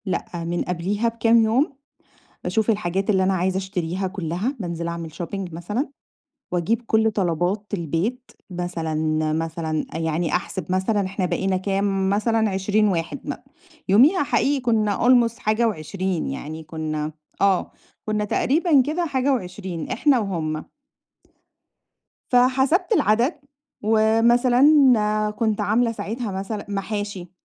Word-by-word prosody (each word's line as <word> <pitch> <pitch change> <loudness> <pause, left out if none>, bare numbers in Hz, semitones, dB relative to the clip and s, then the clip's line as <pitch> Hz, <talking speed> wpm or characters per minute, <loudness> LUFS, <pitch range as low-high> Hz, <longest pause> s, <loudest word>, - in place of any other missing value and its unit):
لأ، 185 -3 -2 0.2
من 170 +1 -2
قبليها 190 +6 -1
بكام 230 0 +3
يوم، 255 +7 +2 0.7
باشوف 220 0 +1
الحاجات 195 -1 0
اللي 190 -2 +3
أنا 190 +1 +2
عايزة 185 +1 0
اشتريها 190 -1 -3
كلّها، 190 - -3
بانزل 170 -2 -3
اعمل 170 -1 -5
shopping 175 +1 -5
مثلًا، 210 - -3 0.6
واجيب 180 +7 0
كل 220 -1 +2
طلبات 185 +1 -1
البيت 195 - -2 0.2
مثلًا 175 -3 -3 0.4
مثلًا 160 -1 -2
آآ، - - -3
يعني 160 0 -1
أحسب 180 -1 -3
مثلًا 190 +2 +1
احنا 190 0 -2
بقينا 190 +1 0
كام 195 0 0
مثلًا 220 +2 +1
20 205 +2 +1
واحد 170 +4 -2
مأ 290 - -4 0.5
يوميها 280 - +5
حقيقي 280 0 +1
كنّا 220 -4 +1
almost 240 -2 +4
حاجة 215 +2 +1
و20 185 -1 -2
يعني 155 +4 -6
كنّا 155 -1 -4 0.3
آه، 195 -2 +2 0.3
كنّا 215 -1 -1
تقريبًا 295 - +3
كده 315 +6 -1
حاجة 275 -2 +1
و20 180 -6 -5
إحنا 270 +2 +3
وهُم. 160 -7 -3 1.6
فحسبت 265 - +3
العدد 250 - +2 0.4
ومثلًا، 225 +4 +3 0.7
كنت 215 0 -1
عاملة 225 +4 +2
ساعتها 220 +1 -4
مثلًا 195 +2 -4
محاشي 200 -3 -4
200 Hz, 125 wpm, -23 LUFS, 175-230 Hz, 1.6 s, يوميها